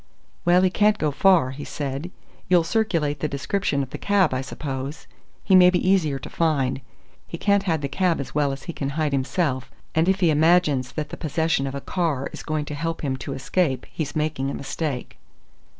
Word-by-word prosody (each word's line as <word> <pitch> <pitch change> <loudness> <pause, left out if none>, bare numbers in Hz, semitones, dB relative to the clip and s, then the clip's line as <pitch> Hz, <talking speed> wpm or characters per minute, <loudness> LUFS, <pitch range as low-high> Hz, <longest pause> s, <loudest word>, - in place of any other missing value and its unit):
"Well, 175 +1 +5
he 185 - +3
can't 210 +1 +3
go 150 -1 0
far," 165 -2 +4
he 140 +2 -7
said. 140 +4 -4 0.4
"You'll 175 -2 +5
circulate 165 -7 0
the 155 - -1
description 140 +1 -1
of 130 - -9
the - - -6
cab, 195 -7 +2
I 130 - -1
suppose? 135 +1 -5 0.4
He 195 - +1
may 180 -1 +8
be 180 0 0
easier 160 -8 +2
to - - -8
find. 140 -5 0 0.5
He 170 - -6
can't 200 +2 +3
hide 165 -6 -1
the - - 0
cab 170 +4 +1
as 140 - -6
well 145 -2 +1
as 135 0 -6
he 170 - -6
can 140 -3 -3
hide 155 -2 +1
himself, 135 0 -1 0.2
and 160 +3 +2
if 190 0 +2
he 175 -4 +4
imagines 150 -5 +3
that 150 -1 -4
the - - -7
possession 155 -2 0
of 135 - -5
a 140 - -4
car 155 -7 -1
is - - -7
going 155 -1 -2
to 150 - -6
help 165 +3 -3
him 135 -2 0
to 135 +1 -5
escape 135 -1 0
he's 155 -4 -4
making 150 -3 -1
a - - -4
mistake." 140 -2 -4
155 Hz, 210 wpm, -24 LUFS, 140-175 Hz, 0.5 s, may